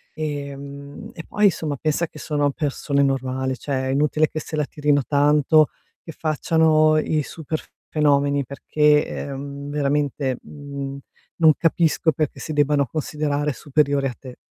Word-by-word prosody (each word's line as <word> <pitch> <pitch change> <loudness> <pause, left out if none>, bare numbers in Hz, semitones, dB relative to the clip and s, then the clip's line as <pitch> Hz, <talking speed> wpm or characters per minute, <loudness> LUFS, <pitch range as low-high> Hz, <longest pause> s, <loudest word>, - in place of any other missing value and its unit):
ehm, 140 -2 -6
e 165 - -8
poi 210 - +1
insomma 160 -6 +1
pensa 155 +4 0
che - - -15
sono 145 -1 0
persone 140 -1 0
normali, 130 -1 -1
cioè 130 -1 -2
è - - 0
inutile 150 +2 +2
che 155 - -4
se 155 - -6
la 150 -1 0
tirino 145 -1 +1
tanto, 150 +1 +4 0.4
che 165 - -8
facciano 155 0 +3
i 155 0 +1
super 155 +1 -5 0.3
fenomeni 145 -2 +2
perché, 150 +2 +2
ehm, 140 +1 -6
veramente, 145 -2 0
mhmm, 140 -1 -7 0.4
non 160 -2 +6
capisco 165 -1 +2
perché 150 0 -2
si 155 - -5
debbano 145 -1 +2
considerare 150 0 -2
superiori 140 +1 +1
a 125 - -5
te, 130 -2 -11
145 Hz, 145 wpm, -22 LUFS, 140-155 Hz, 0.4 s, non